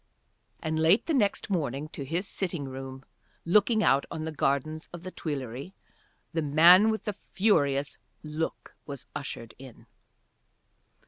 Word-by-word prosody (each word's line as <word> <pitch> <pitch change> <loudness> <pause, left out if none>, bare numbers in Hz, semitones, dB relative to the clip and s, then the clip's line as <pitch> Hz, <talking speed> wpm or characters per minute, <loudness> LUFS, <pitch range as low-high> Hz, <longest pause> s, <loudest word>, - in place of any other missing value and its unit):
And 155 0 -1
late 165 +7 +4
next 215 -8 +1
morning 150 -5 -1
to 140 - -6
his 170 +8 -2
sitting 175 -8 -3
room 135 0 -8 0.4
looking 210 +5 +4
out 135 +1 +4
on 160 -2 -4
the 160 - -3
Gardens 155 +2 -1
of 175 0 -9
the 185 - -6
Tuileries 140 +1 -5 0.6
the 165 - 0
man 170 +8 +7
with 220 0 -1
the 210 - -2
furious 145 -10 +1 0.2
look 155 +1 -4
was 140 -3 -7
ushered 115 -4 -6
in. 130 -3 -13
155 Hz, 135 wpm, -28 LUFS, 140-185 Hz, 0.6 s, man